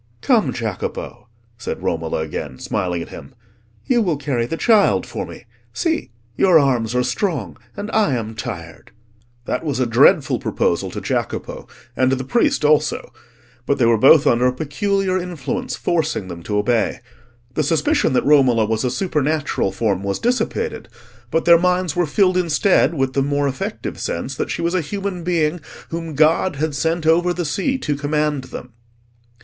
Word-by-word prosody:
"Come, 240 Hz, -5 st, +2 dB
Jacopo," 110 Hz, -2 st, -5 dB, 0.3 s
said 115 Hz, -, -5 dB
Romola 80 Hz, -1 st, -1 dB
again, 75 Hz, -3 st, -5 dB
smiling 90 Hz, +2 st, -2 dB
at -, -, -12 dB
him, 130 Hz, -, -11 dB, 0.5 s
"you 245 Hz, -2 st, +2 dB
will 175 Hz, -8 st, 0 dB
carry 130 Hz, -5 st, -1 dB
the 165 Hz, -, -3 dB
child 220 Hz, 0 st, +3 dB
for -, -, -5 dB
me. -, -, -11 dB, 0.3 s
See! 325 Hz, -2 st, -1 dB, 0.3 s
your 180 Hz, +2 st, +5 dB
arms 125 Hz, -6 st, +1 dB
are 125 Hz, -, +2 dB
strong, 150 Hz, -, -2 dB, 0.2 s
and 205 Hz, +2 st, -5 dB
I 210 Hz, -12 st, +2 dB
am 110 Hz, -2 st, -4 dB
tired." 85 Hz, -6 st, -7 dB, 0.6 s
That 125 Hz, -, -2 dB
was 145 Hz, -5 st, -2 dB
a 130 Hz, -, +2 dB
dreadful 115 Hz, 0 st, +4 dB
proposal -, -, -1 dB
to -, -, -6 dB
Jacopo, -, -, -3 dB, 0.3 s
and 130 Hz, 0 st, +2 dB
to 135 Hz, -, +2 dB
the 130 Hz, -, -4 dB
priest 240 Hz, -, +1 dB
also; 150 Hz, 0 st, +1 dB, 0.5 s
but 140 Hz, -, +2 dB
they 125 Hz, -, +3 dB
were 115 Hz, 0 st, +5 dB
both 140 Hz, +5 st, +7 dB
under 120 Hz, -1 st, +3 dB
a 125 Hz, -, +1 dB
peculiar 185 Hz, +7 st, -1 dB
influence 180 Hz, -, -4 dB
forcing 160 Hz, -, -1 dB
them 85 Hz, -1 st, -7 dB
to 105 Hz, -, -1 dB
obey. 115 Hz, +2 st, +1 dB, 0.5 s
The 155 Hz, -, 0 dB
suspicion 150 Hz, -2 st, +1 dB
that -, -, +1 dB
Romola 130 Hz, -6 st, +4 dB
was 110 Hz, 0 st, -1 dB
a 125 Hz, -, +1 dB
supernatural 150 Hz, -, -1 dB
form 100 Hz, -5 st, -1 dB
was 100 Hz, 0 st, -2 dB
dissipated, 255 Hz, -, -2 dB, 0.4 s
but 165 Hz, -, 0 dB
their 170 Hz, -1 st, +7 dB
minds 180 Hz, -2 st, +1 dB
were 175 Hz, -2 st, +1 dB
filled 185 Hz, +3 st, +2 dB
instead 170 Hz, -2 st, +2 dB
with 135 Hz, -2 st, 0 dB
the 135 Hz, -, +1 dB
more 145 Hz, +1 st, 0 dB
effective 130 Hz, -1 st, -4 dB
sense 105 Hz, +11 st, -3 dB
that -, -, -2 dB
she -, -, -3 dB
was 170 Hz, +1 st, 0 dB
a 185 Hz, -, +1 dB
human 195 Hz, +2 st, -4 dB
being 165 Hz, -1 st, 0 dB, 0.3 s
whom 165 Hz, -2 st, -5 dB
God 155 Hz, +4 st, +3 dB
had 155 Hz, +2 st, -2 dB
sent 160 Hz, +4 st, -1 dB
over 175 Hz, +2 st, +3 dB
the 175 Hz, -, -2 dB
sea 200 Hz, -, -1 dB
to 150 Hz, -, -2 dB
command 150 Hz, -1 st, -1 dB
them. 125 Hz, -2 st, -9 dB
150 Hz, 175 wpm, -20 LUFS, 125-180 Hz, 0.6 s, both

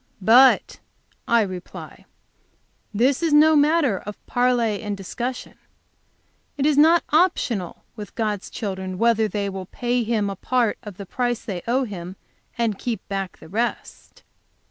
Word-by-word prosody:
But, 240 Hz, +7 st, +5 dB, 0.5 s
I 235 Hz, 0 st, +4 dB
reply, 185 Hz, -3 st, -9 dB, 0.9 s
this 250 Hz, +7 st, +1 dB
is 330 Hz, -3 st, +1 dB
no 310 Hz, +1 st, +6 dB
matter 290 Hz, -, +3 dB
of 210 Hz, 0 st, -10 dB
parley 245 Hz, -4 st, +1 dB
and 205 Hz, -2 st, -4 dB
discussion; 240 Hz, +6 st, -6 dB, 1.0 s
it 280 Hz, -, 0 dB
is 300 Hz, -1 st, +3 dB
not 320 Hz, +4 st, +5 dB
optional 285 Hz, -, +1 dB
with 210 Hz, -2 st, -9 dB
God's 210 Hz, -4 st, -2 dB
children 190 Hz, -3 st, -5 dB
whether 230 Hz, 0 st, +2 dB
they 205 Hz, -1 st, -3 dB
will 190 Hz, -2 st, -6 dB
pay 245 Hz, +3 st, -1 dB
Him 220 Hz, -3 st, 0 dB
a 195 Hz, -, -4 dB
part 240 Hz, +2 st, 0 dB
of 205 Hz, -4 st, -10 dB
the 200 Hz, -, -7 dB
price 245 Hz, +3 st, -2 dB
they 185 Hz, -5 st, -4 dB
owe 255 Hz, +3 st, +1 dB
Him, 185 Hz, -5 st, -7 dB, 0.4 s
and 225 Hz, -4 st, -1 dB
keep 235 Hz, -3 st, -4 dB
back 195 Hz, -2 st, -4 dB
the -, -, -14 dB
rest. 225 Hz, +7 st, -4 dB
225 Hz, 145 wpm, -22 LUFS, 200-255 Hz, 1.0 s, no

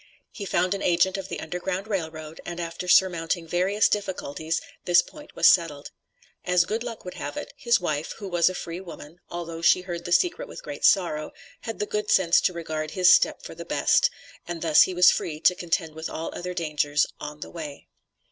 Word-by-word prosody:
He 200 Hz, -, -7 dB
found 185 Hz, 0 st, +1 dB
an 200 Hz, -, -4 dB
agent 175 Hz, +1 st, +2 dB
of 195 Hz, -1 st, -5 dB
the -, -, -5 dB
Underground 180 Hz, +4 st, -4 dB
Rail 190 Hz, -7 st, -2 dB
Road, 155 Hz, 0 st, -10 dB
and 175 Hz, 0 st, -6 dB
after 170 Hz, +1 st, -5 dB
surmounting 175 Hz, -2 st, +3 dB
various 195 Hz, +5 st, +2 dB
difficulties, 165 Hz, -6 st, -2 dB, 0.3 s
this 175 Hz, 0 st, +5 dB
point 300 Hz, -, -14 dB
was -, -, +5 dB
settled. 160 Hz, -5 st, +2 dB, 0.5 s
As 180 Hz, -1 st, +3 dB
good 220 Hz, +5 st, -2 dB
luck 235 Hz, -4 st, -7 dB
would 180 Hz, -, -6 dB
have -, -, -6 dB
it, 295 Hz, -, -6 dB
his 240 Hz, -4 st, +2 dB
wife, 155 Hz, -4 st, -2 dB
who 205 Hz, -, -8 dB
was 175 Hz, -1 st, +3 dB
a 185 Hz, -, -6 dB
free 170 Hz, 0 st, -5 dB
woman, 170 Hz, -2 st, -11 dB
although 170 Hz, -1 st, -6 dB
she 180 Hz, -, +5 dB
heard 175 Hz, -2 st, -6 dB
the 175 Hz, -, -5 dB
secret 360 Hz, -, +2 dB
with -, -, -10 dB
great -, -, -8 dB
sorrow, 165 Hz, -6 st, +2 dB, 0.3 s
had 225 Hz, -, -6 dB
the 210 Hz, -, -1 dB
good 210 Hz, 0 st, -3 dB
sense 175 Hz, -3 st, +4 dB
to -, -, +2 dB
regard 155 Hz, -3 st, -4 dB
his 185 Hz, +2 st, +5 dB
step -, -, +2 dB
for -, -, -8 dB
the -, -, -8 dB
best, 485 Hz, -, +3 dB, 0.4 s
and 170 Hz, -1 st, -5 dB
thus 160 Hz, -2 st, +6 dB
he 185 Hz, -, +4 dB
was 180 Hz, 0 st, +7 dB
free 155 Hz, -2 st, -3 dB
to 180 Hz, -, +5 dB
contend 165 Hz, -3 st, -2 dB
with 160 Hz, +1 st, -6 dB
all 160 Hz, -, -5 dB
other 180 Hz, 0 st, -5 dB
dangers 150 Hz, -3 st, +1 dB
on 150 Hz, 0 st, -8 dB
the -, -, -7 dB
way. 150 Hz, -4 st, -8 dB
175 Hz, 210 wpm, -25 LUFS, 165-190 Hz, 0.5 s, was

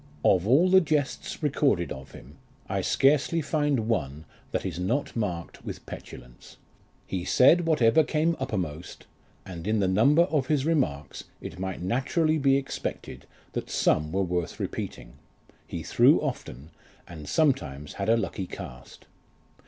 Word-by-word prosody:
Of 95 Hz, +1 st, +4 dB
all 145 Hz, +10 st, +5 dB
the 190 Hz, 0 st, +7 dB
jests 150 Hz, -1 st, -2 dB
recorded 135 Hz, -, +1 dB
of 65 Hz, 0 st, -8 dB
him, -, -, -13 dB, 0.3 s
I -, -, -1 dB
scarcely 145 Hz, +4 st, +2 dB
find 145 Hz, -6 st, 0 dB
one 75 Hz, -, -2 dB, 0.2 s
that -, -, -3 dB
is 90 Hz, -2 st, -4 dB
not 95 Hz, +11 st, -1 dB
marked 90 Hz, -7 st, -4 dB
with -, -, -7 dB
petulance: 60 Hz, -1 st, -11 dB, 0.5 s
he 95 Hz, -2 st, -3 dB
said 165 Hz, -, +5 dB
whatever 155 Hz, -1 st, +4 dB
came 160 Hz, +2 st, +1 dB
uppermost, 85 Hz, -2 st, -4 dB, 0.4 s
and 90 Hz, -1 st, -7 dB
in 110 Hz, 0 st, +1 dB
the 95 Hz, -, +2 dB
number 140 Hz, -, +4 dB
of 150 Hz, -7 st, 0 dB
his 145 Hz, -2 st, +1 dB
remarks 105 Hz, -, -1 dB
it 80 Hz, -, -8 dB
might 95 Hz, -2 st, -4 dB
naturally 155 Hz, -, +1 dB
be 135 Hz, -1 st, +4 dB
expected 135 Hz, -, -5 dB, 0.3 s
that -, -, -4 dB
some 75 Hz, 0 st, +1 dB
were 95 Hz, +2 st, +1 dB
worth 90 Hz, -2 st, -3 dB
repeating; -, -, -5 dB, 0.5 s
he -, -, -5 dB
threw -, -, +5 dB
often, 70 Hz, +7 st, -5 dB, 0.4 s
and 75 Hz, -4 st, -9 dB
sometimes 75 Hz, -, 0 dB
had 100 Hz, +2 st, -3 dB
a 115 Hz, -, +5 dB
lucky 95 Hz, -3 st, -3 dB
cast. 60 Hz, -6 st, -10 dB
110 Hz, 145 wpm, -27 LUFS, -, 0.5 s, the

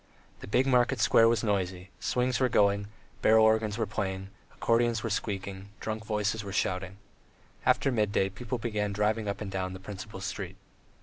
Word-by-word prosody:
The -, -, -9 dB
big 125 Hz, +6 st, +2 dB
market 125 Hz, -2 st, +3 dB
square 115 Hz, 0 st, +5 dB
was 115 Hz, 0 st, +1 dB
noisy, 95 Hz, -3 st, -1 dB
swings 125 Hz, 0 st, 0 dB
were 130 Hz, -1 st, +3 dB
going, 100 Hz, -2 st, +3 dB, 0.3 s
barrel 110 Hz, 0 st, +6 dB
organs 110 Hz, -1 st, +2 dB
were 115 Hz, -, 0 dB
playing, 95 Hz, -2 st, -3 dB, 0.2 s
accordions 115 Hz, -1 st, +1 dB
were 115 Hz, -, -2 dB
squeaking, 100 Hz, -2 st, -3 dB
drunken 110 Hz, 0 st, -4 dB
voices 105 Hz, 0 st, 0 dB
were 100 Hz, -, -6 dB
shouting. 95 Hz, 0 st, -1 dB, 0.7 s
After 135 Hz, -, +3 dB
midday 105 Hz, -4 st, +1 dB
people 120 Hz, +6 st, -4 dB
began 105 Hz, -3 st, -2 dB
driving 105 Hz, +1 st, 0 dB
up 100 Hz, -, -3 dB
and 100 Hz, -2 st, -4 dB
down 95 Hz, -1 st, -2 dB
the 95 Hz, -, -7 dB
principal 95 Hz, +1 st, -8 dB
street. 95 Hz, -, -5 dB
105 Hz, 170 wpm, -29 LUFS, 95-115 Hz, 0.7 s, barrel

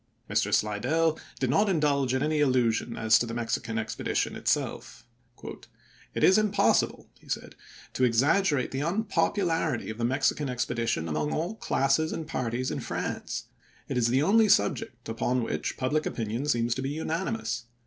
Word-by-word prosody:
Mr. -, -, 0 dB
Slidell 145 Hz, +10 st, +1 dB, 0.2 s
did 130 Hz, -2 st, +1 dB
not 205 Hz, +8 st, +3 dB
indulge 140 Hz, -6 st, +1 dB
in 130 Hz, -, 0 dB
any 155 Hz, 0 st, +1 dB
illusion 125 Hz, -4 st, +1 dB
as 110 Hz, -1 st, +4 dB
to 120 Hz, -, -1 dB
the 115 Hz, -, -5 dB
Mexican 115 Hz, -1 st, -2 dB
expedition 110 Hz, -, -2 dB
itself. -, -, -2 dB, 0.5 s
" -, -, -25 dB
It -, -, -1 dB
is 190 Hz, +3 st, +6 dB
impossible," 205 Hz, -1 st, +1 dB
he -, -, -20 dB
said, -, -, -4 dB, 0.4 s
"to 130 Hz, -, -1 dB
exaggerate 135 Hz, +5 st, +2 dB
the 135 Hz, -, -2 dB
unpopularity 170 Hz, -, 0 dB
of 110 Hz, -, -9 dB
the -, -, -2 dB
Mexican 135 Hz, +3 st, +1 dB
expedition 115 Hz, -8 st, -1 dB
among 75 Hz, -1 st, -1 dB
all 170 Hz, +6 st, -2 dB
classes 160 Hz, -5 st, +1 dB
and 160 Hz, -, -4 dB
parties 125 Hz, -4 st, -2 dB
in -, -, -3 dB
France; -, -, -4 dB, 0.4 s
it -, -, -3 dB
is 120 Hz, -2 st, +2 dB
the 130 Hz, +4 st, +2 dB
only 215 Hz, +4 st, +4 dB
subject 120 Hz, -, +1 dB
upon 120 Hz, +2 st, 0 dB
which -, -, -3 dB
public 150 Hz, +4 st, 0 dB
opinion 115 Hz, +5 st, -3 dB
seems 120 Hz, -4 st, +1 dB
to 130 Hz, -, -4 dB
be 135 Hz, -, -2 dB
unanimous. 165 Hz, -, -3 dB
130 Hz, 160 wpm, -28 LUFS, 115-160 Hz, 0.5 s, is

